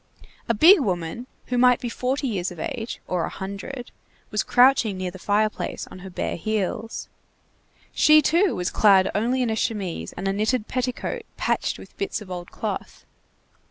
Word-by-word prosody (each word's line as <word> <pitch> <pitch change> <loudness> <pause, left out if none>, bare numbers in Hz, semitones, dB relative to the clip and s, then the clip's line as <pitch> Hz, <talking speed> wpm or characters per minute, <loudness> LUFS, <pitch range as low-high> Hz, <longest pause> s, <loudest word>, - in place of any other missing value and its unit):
A 230 - +3
big 340 - +8
woman, 185 - -2 0.2
who 250 -1 -1
might 250 -1 +5
be 245 - -4
forty 260 +4 -1
years 190 -6 -1
of 175 -3 -10
age, 225 +7 -4
or 180 -2 0
a - - -2
hundred, 200 +7 -7 0.4
was 210 - +1
crouching 245 -5 +4
near 185 -1 -3
the 190 - -11
fireplace 210 +2 -1
on - - -10
her 190 +1 -9
bare 180 - -3
heels. 215 +3 -3 0.9
She, 305 0 +6
too, 340 +6 +2
was 180 0 -2
clad 195 -3 +5
only 245 +5 +1
in 235 - 0
a - - 0
chemise 200 - -2
and 195 - -4
a 195 - +1
knitted 215 +3 0
petticoat 255 - -2 0.2
patched - - 0
with - - -14
bits 395 -9 -2
of 205 -4 -11
old 175 -1 -6
cloth. - - -5
215 Hz, 175 wpm, -24 LUFS, 190-250 Hz, 0.9 s, big